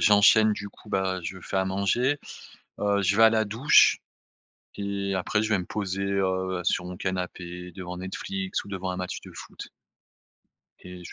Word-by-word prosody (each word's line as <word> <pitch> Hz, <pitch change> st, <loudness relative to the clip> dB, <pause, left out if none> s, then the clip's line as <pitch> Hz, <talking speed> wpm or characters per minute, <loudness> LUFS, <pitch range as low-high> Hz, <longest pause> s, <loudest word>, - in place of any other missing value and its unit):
j'enchaîne, 105 Hz, +1 st, +6 dB
du 100 Hz, 0 st, -5 dB
coup, 105 Hz, -, -17 dB
bah 95 Hz, -1 st, 0 dB
je 90 Hz, +3 st, -5 dB
fais 95 Hz, -, -4 dB
à 95 Hz, -, +2 dB
manger, 100 Hz, +9 st, +1 dB, 0.6 s
heu, 100 Hz, 0 st, +2 dB
je 100 Hz, +1 st, +2 dB
vais 115 Hz, -, +7 dB
à 110 Hz, -, +9 dB
la 110 Hz, -1 st, +2 dB
douche 115 Hz, +8 st, +5 dB, 0.8 s
et 100 Hz, -1 st, -2 dB
après 95 Hz, +3 st, 0 dB
je 110 Hz, -, -1 dB
vais 100 Hz, -3 st, +2 dB
me 90 Hz, -, -5 dB
poser, 95 Hz, -1 st, -3 dB
heu, 95 Hz, -1 st, 0 dB
sur 90 Hz, -, 0 dB
mon 90 Hz, 0 st, -7 dB
canapé, 90 Hz, -1 st, -4 dB
devant 90 Hz, -2 st, -6 dB
Netflix 190 Hz, -, -4 dB
ou -, -, -14 dB
devant 95 Hz, -2 st, -4 dB
un 90 Hz, -, -3 dB
match 90 Hz, -1 st, -4 dB
de -, -, -11 dB
foot. -, -, -10 dB, 1.1 s
Et 90 Hz, 0 st, -10 dB
je -, -, -10 dB
95 Hz, 185 wpm, -26 LUFS, 90-105 Hz, 1.1 s, à